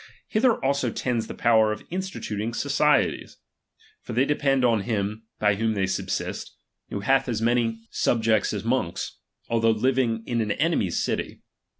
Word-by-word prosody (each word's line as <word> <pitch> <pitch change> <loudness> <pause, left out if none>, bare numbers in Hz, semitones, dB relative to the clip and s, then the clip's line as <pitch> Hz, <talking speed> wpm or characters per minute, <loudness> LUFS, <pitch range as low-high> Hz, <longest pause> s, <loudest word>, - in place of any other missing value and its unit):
Hither 230 +1 +3
also 140 -2 +1
tends 120 0 -2
the - - -7
power 110 -2 +4
of 105 - -5
instituting 120 - -3
societies. 145 0 +1 0.6
For - - -7
they 125 +4 +3
depend 135 -3 +2
on 115 -4 +3
him 105 0 -3
by 105 -1 +3
whom 110 +2 0
they 95 -1 +1
subsist, 95 - -3 0.3
who 100 - -4
hath 135 +5 +2
as 115 -3 -1
many 120 +1 +2
318 115 0 -2
xviii 115 0 -23 0.5
subjects - - -2
as - - -3
monks, 115 -7 -2 0.3
although 115 -1 +2
living 115 0 +1
in 120 -1 0
an 105 -1 0
enemy's 150 - 0
~' - - 0
city. - - -3
115 Hz, 170 wpm, -25 LUFS, 110-135 Hz, 0.6 s, power